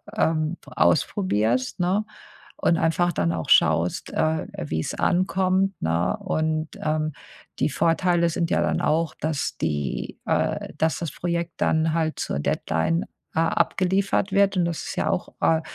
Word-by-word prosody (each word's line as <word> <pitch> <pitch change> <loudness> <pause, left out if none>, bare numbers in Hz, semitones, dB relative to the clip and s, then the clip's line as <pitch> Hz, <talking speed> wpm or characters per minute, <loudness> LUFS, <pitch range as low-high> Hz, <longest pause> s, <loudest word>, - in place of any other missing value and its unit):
ähm, 160 +1 +1
ausprobierst, 130 - +1
ne? 190 +4 +1 0.5
Und 170 - +2
einfach 175 +2 +2
dann 85 - 0
auch 80 -2 -4
schaust, - - +3
äh, 155 0 0
wie's 80 0 -3
ankommt, 185 +1 +1
ne? 85 +3 +1
Und, 155 0 -1
ähm, 155 0 0 0.5
die - - +2
Vorteile 170 +3 +2
sind 170 0 -1
ja 85 - +3
dann 80 -1 +1
auch, 160 0 +1
dass 155 -2 -2
die 75 -3 -3
äh, - - -1
dass 160 0 +1
das 170 -5 -3
Projekt 170 -1 -2
dann 160 0 +1
halt 160 -1 -1
zur 70 - -2
Deadline 80 - 0 0.3
a 165 +1 +2
abgeliefert 190 +3 +1
wird. 200 -1 +3
Und 175 - +3
das 170 -1 -3
ist - - -5
ja - - 0
auch, - - -2
äh, 160 0 +3
160 Hz, 150 wpm, -24 LUFS, 150-175 Hz, 0.5 s, schaust